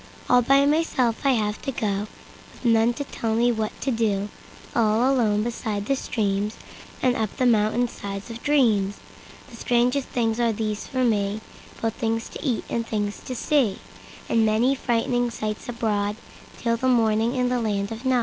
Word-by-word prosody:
All 250 0 +5
by 275 +3 +4
myself 285 -6 +1
I 270 - +5
have 210 -3 -1
to 270 - -3
go, 205 -3 -2 0.5
With - - -15
none 230 0 +4
to 285 - -3
tell 225 -5 -3
me 240 +1 +3
what 220 -2 -3
to 270 - 0
do—All 220 +2 0
alone 210 -5 +2
beside 220 -3 -3
the 275 - +1
streamsAnd 215 +2 -2
up 220 -2 -2
the 255 - +1
mountain 230 +1 +3
sides 200 0 -7
of 230 +1 -8
dreams. 220 -9 +2 0.5
The 230 - -11
strangest 250 +4 +1
things 230 -1 0
are 235 -1 +3
there 215 0 -1
for 255 +5 -3
me, 205 -3 +1 0.4
Both 225 -1 +1
things 225 -1 -2
to - - -8
eat 245 -5 0
and 230 - -1
things 205 -2 -3
to 255 - -6
see, 250 -7 +1 0.5
And 225 - +3
many 220 +5 +3
frightening 245 -1 0
sights 215 -2 -4
abroadTill 225 +1 -3
morning 225 0 +2
in 250 -1 +1
the 250 -1 0
land 205 -2 -1
of 225 +2 -6
Nod. 260 -1 +3
230 Hz, 170 wpm, -24 LUFS, 215-245 Hz, 0.5 s, All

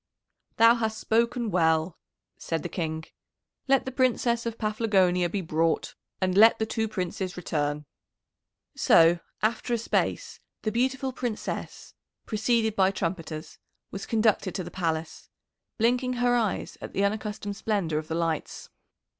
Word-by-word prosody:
"Thou 230 +1 +7
hast 220 -2 -1
spoken 235 0 0
well," 160 -1 +2 0.4
said 165 -2 -3
the - - -4
King. 160 -2 -3 0.6
"Let 270 -1 +3
the 260 - -4
Princess 240 -2 +1
of 230 -1 -4
Paphlagonia 195 -5 +2
be 195 +3 -2
brought, 165 -1 0 0.3
and 185 -1 0
let 225 +3 +7
the 220 - 0
two 220 0 -1
Princes 185 -2 -4
return." 150 -3 -2 0.9
So 165 +1 +5 0.2
after 235 +2 +1
a - - 0
space 230 - -1 0.2
the 215 - 0
beautiful 260 +2 0
Princess, 245 -4 -5 0.3
preceded 220 0 +1
by 190 -2 +4
trumpeters, 165 -4 -4 0.3
was 195 0 -6
conducted 215 -4 +1
to 185 - -2
the 175 - -8
Palace, 165 -3 -3 0.5
blinking 250 +3 +2
her 245 0 +2
eyes 225 -5 -1
at - - -8
the 195 - +1
unaccustomed 210 0 -3
splendour 195 -8 -1
of 155 - -8
the 160 - -3
lights. 165 -2 -3
205 Hz, 140 wpm, -27 LUFS, 170-230 Hz, 0.9 s, Thou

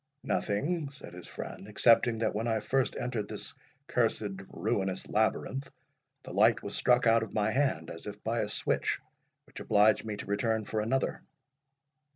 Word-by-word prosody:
"Nothing," 145 - -1
said 140 -9 -11
his 90 -1 -9
friend, 100 - -7
"excepting 115 +2 +4
that 115 - 0
when 110 +3 -1
I 110 -1 +1
first 135 +4 0
entered 120 -4 -2
this - - -6 0.3
cursed 110 -9 0
ruinous 95 -1 -2
labyrinth, 110 +5 0 0.5
the - - -8
light - - +4
was - - -4
struck 125 0 +3
out 115 0 +5
of 110 - -6
my 110 0 +2
hand, 130 - 0
as 85 - -9
if 105 0 -8
by 115 +1 0
a 105 - -1
switch, - - 0 0.5
which - - -11
obliged 105 0 +4
me 110 -2 -4
to - - -6
return 110 +2 0
for 110 +1 -1
another." 130 +5 0
110 Hz, 170 wpm, -30 LUFS, 105-125 Hz, 0.5 s, out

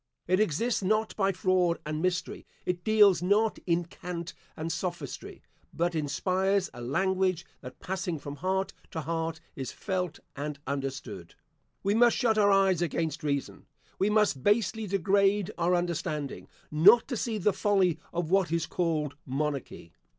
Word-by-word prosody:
It 185 +2 +2
exists 215 +5 +1
not 215 +3 0
by 195 -2 +2
fraud 180 -2 +2
and 155 0 -3
mystery; 180 0 -2 0.2
it 175 -1 -2
deals 210 -3 +5
not 210 +4 +2
in 170 0 +1
cant 170 0 -6 0.2
and 165 +1 -3
sophistry; 170 -4 -5 0.3
but 175 +1 0
inspires 185 +6 0
a 120 - -9
language 185 +6 0 0.2
that, 125 -1 -10
passing 185 -2 -3
from 145 0 -8
heart 190 +2 -1 0.2
to 160 - -4
heart, 165 +1 -3 0.2
is 135 -3 -5
felt 180 -3 -3 0.2
and 145 +1 -4
understood. 135 - -5 0.5
We 200 - +2
must 235 +1 +5
shut 225 -4 +2
our 205 -1 +5
eyes 195 -3 +4
against 165 -2 -1
reason, 140 -3 -3 0.3
we 195 - +3
must 210 -10 +2
basely 215 - +1
degrade 200 +1 +2
our 175 +1 +2
understanding, 155 -5 -3 0.2
not 195 +10 +6
to 255 - -1
see 225 -1 -2
the 210 0 +2
folly 190 -4 +2
of 170 -1 -3
what 190 -4 +3
is 170 0 +1
called 155 -5 -1
monarchy. 140 - -3
180 Hz, 150 wpm, -29 LUFS, 155-195 Hz, 0.5 s, not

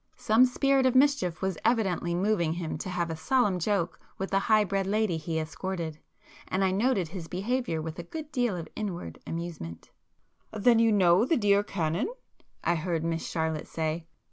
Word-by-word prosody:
Some 225 +4 +5
spirit 270 +1 +2
of 255 - +1
mischief 260 - +3
was 190 -3 -1
evidently 195 -7 +1
moving 180 -4 +1
him 170 -2 -4
to 185 - -5
have 175 -2 -1
a - - -3
solemn 205 +1 +1
joke 185 -1 0 0.2
with 195 - -4
the 195 - +3
high 215 +1 +4
bred 195 -1 -1
lady 210 -3 +1
he 160 0 -3
escorted, 160 0 -4 0.5
and 190 +1 0
I 190 - +3
noted 195 -4 +1
his 170 -2 -7
behaviour 195 -3 -2
with 160 +1 -6
a - - -4
good 310 -2 -6
deal 245 -7 0
of 165 - -6
inward 195 -5 -5
amusement. 165 - -6 0.6
[p - - -6
135]"Then 230 +2 +5
you 230 -1 +4
know 185 -1 +5
the 310 +6 +2
dear 205 -3 +4
Canon?" 175 - -1 0.5
I 170 - +2
heard 165 -1 -1
Miss 165 0 -2
Charlotte 160 -2 -2
say. 160 +1 -3
185 Hz, 185 wpm, -28 LUFS, 165-220 Hz, 0.6 s, Some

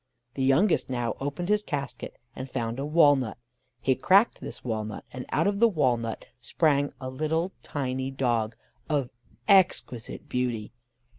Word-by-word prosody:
The 135 - -4
youngest 135 +9 +3
now 120 -3 -1
opened 145 +6 -3
his 210 0 +3
casket, 140 -8 -5 0.2
and 130 +1 -6
found 120 -1 -3
a 140 - -2
walnut: 145 -7 +4 0.4
he 130 - +2
cracked 190 - +4
this - - -7
walnut, 110 -3 -4
and 125 0 -6
out 160 - +2
of 200 0 +1
the 235 - +7
walnut 125 - 0
sprang 145 +3 +1
a 130 - -5
little 155 +7 -1
tiny 130 -2 -3
dog, 120 -5 0 0.3
of 140 -5 0 0.4
exquisite 185 - +2
beauty. 120 -4 -2
135 Hz, 145 wpm, -27 LUFS, 120-155 Hz, 0.4 s, the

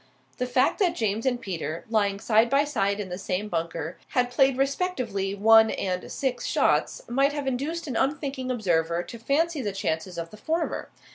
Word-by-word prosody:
The 250 - 0
fact 245 - +2
that 365 -4 +2
James 220 +2 -1
and 245 -2 +1
Peter, 170 -6 -4
lying 205 -3 +1
side 220 +2 +3
by 275 +2 +4
side 200 -9 0
in 200 -3 -4
the 180 +1 -5
same 195 +2 -2
bunker, 165 -1 -3 0.2
had 245 0 +2
played 265 +1 +3
respectively 255 - -1
one 220 +2 +6
and 180 -1 -3
six 255 -3 -2
shots, - - +1
might 275 +4 +2
have 290 -2 -3
induced 285 +7 -2
an 265 -6 -4
unthinking 270 -1 -1
observer 170 -7 +1
to 235 - -10
fancy 305 +5 +1
the 210 -4 -2
chances 180 -2 -3
of 165 0 -5
the 215 - -11
former. 320 +8 -2
230 Hz, 185 wpm, -26 LUFS, 195-275 Hz, 0.2 s, one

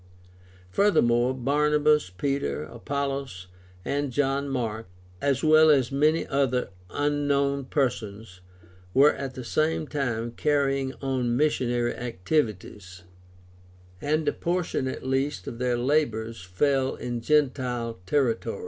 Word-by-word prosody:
Furthermore, 120 - +3
Barnabas, 150 0 +2
Peter, 90 - -2
Apollos, 135 - -4 0.4
and 145 -1 -1
John 140 +1 0
Mark, 115 -5 -3 0.3
as 140 -2 +1
well 155 0 +6
as 135 -5 +3
many 150 +4 +2
other 135 -3 0 0.2
unknown 140 0 0
persons, 110 -8 -3 0.5
were 140 +3 +6
at 135 -2 -6
the 130 - -6
same 155 +5 0
time 120 -6 -2
carrying 135 0 0
on 125 -3 0
missionary 120 -5 +1
activities, 105 - -3 1.0
and 155 +2 0
a - - +2
portion 170 -6 -1
at 130 - -5
least 135 -5 -1
of 115 - -7
their 125 -1 +1
labors 115 -5 0
fell 130 +9 0
in 120 -1 -4
gentile 125 -5 0
territory. 135 -6 0
135 Hz, 110 wpm, -26 LUFS, 120-145 Hz, 1.0 s, well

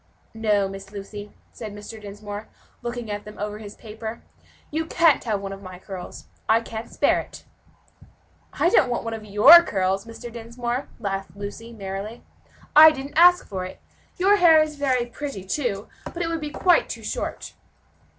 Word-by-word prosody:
"No, 210 -3 +1
Miss 195 0 -9
Lucy," 205 0 -8 0.2
said 215 -3 -8
Mr. 210 +1 -9
Dinsmore, 205 +1 -8 0.3
looking 240 -2 -5
at 205 0 -4
them 210 0 -11
over 210 +1 -4
his 210 -1 -10
paper, 220 +1 -8 0.5
"you 320 +2 -2
can't 330 -3 +4
have 215 -3 0
one 195 0 -5
of 195 - -10
my 185 -2 -9
curls; 185 0 -9 0.2
I 225 - +5
can't 225 0 -7
spare - - +2
it." - - -10 1.1
"I - - +2
don't 265 - +4
want 240 - -2
one 230 -1 -4
of 220 -1 -6
your 215 +12 +9
curls, 195 - -1
Mr. 230 +1 -9
Dinsmore," 240 +2 -4
laughed 195 -2 -4
Lucy, 205 +3 -7
merrily. 200 +1 -6 0.5
"I 310 +1 +11
didn't 280 -2 -6
ask 355 +2 +6
for 190 -3 -4
it. 185 - -8 0.4
Your 395 +3 +4
hair 330 -4 +7
is 305 -1 -6
very 260 -4 +1
pretty, 240 -4 -6
too, 200 -1 -2 0.2
but 345 - -3
it 330 - -2
would 330 -1 -3
be 300 - -4
quite 355 +4 +3
too - - -6
short." - - -4
225 Hz, 175 wpm, -24 LUFS, 205-275 Hz, 1.1 s, I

